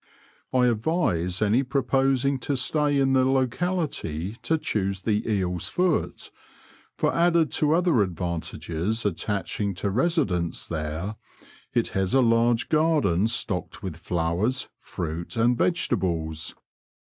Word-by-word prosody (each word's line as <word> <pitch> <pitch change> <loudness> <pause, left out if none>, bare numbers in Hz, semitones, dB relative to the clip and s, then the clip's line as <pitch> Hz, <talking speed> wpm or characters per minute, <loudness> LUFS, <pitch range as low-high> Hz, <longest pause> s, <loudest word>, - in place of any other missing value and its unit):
I 125 -1 +3
advise 110 - 0
any 110 +5 +3
proposing 135 0 +1
to 140 +2 -2
stay 145 +2 +1
in 135 -1 +3
the 130 -1 +4
locality 130 - -1
to 160 - +1
choose 100 -9 -2
the 110 +1 0
Eel's 90 -4 0
Foot, 180 -3 -1 0.6
for - - +1
added 170 -2 +3
to 150 0 +2
other 170 - +3
advantages 90 +2 -2
attachii^ 100 0 -2
to 100 +2 -2
residence 115 - 0
there, 80 +6 -4 0.5
it - - +1
has 95 +3 0
a 130 -2 +5
lai^e 115 +1 +3
garden 150 - +2
stocked 105 -4 -2
with 95 -5 -4
flowers, 85 +8 -1
fruit, 85 +5 -5
and 120 +2 +3
vegetables. 85 - -1
110 Hz, 120 wpm, -25 LUFS, 90-135 Hz, 0.6 s, a